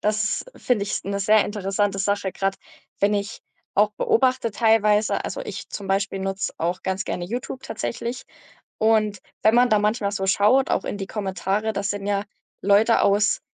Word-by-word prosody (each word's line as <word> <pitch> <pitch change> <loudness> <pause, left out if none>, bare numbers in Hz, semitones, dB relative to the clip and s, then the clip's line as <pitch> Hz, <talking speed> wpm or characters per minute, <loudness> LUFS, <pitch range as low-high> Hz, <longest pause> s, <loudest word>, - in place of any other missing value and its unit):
das 215 +1 0
ist - - -16
finde 235 -5 +1
ich, - - -5
ist - - -3
'ne 200 0 -2
sehr 215 +1 +4
interessante 200 -1 -1
Sache 200 -1 0
grad, 195 0 -1 0.4
wenn 205 +1 +3
ich 205 +2 -3 0.3
auch 210 +1 +3
beobachte 255 -1 +2
teilweise 215 -1 +2
Also, - - -4
ich - - -7
zum 200 - -6
Beispiel 195 +1 0
nutze 195 0 -2
auch 175 +2 -2
ganz 190 0 -2
gerne 175 - -3
YouTube 245 +5 -5
tatsächlich. 235 +3 -4 0.5
Und 215 -2 +2 0.2
wenn 220 +2 +5
man 245 +1 +5
da 215 - +5
manchmal 210 -1 0
so 195 -1 -2
schaut, 210 +8 +3
auch - - +1
in 205 - -4
die 195 - -4
Kommentare, 200 +2 -2
das 200 -1 -2
sind 205 -1 -4
ja 200 0 0 0.4
Leute 205 +4 +4
aus 205 +2 +3
205 Hz, 180 wpm, -23 LUFS, 195-220 Hz, 0.5 s, wenn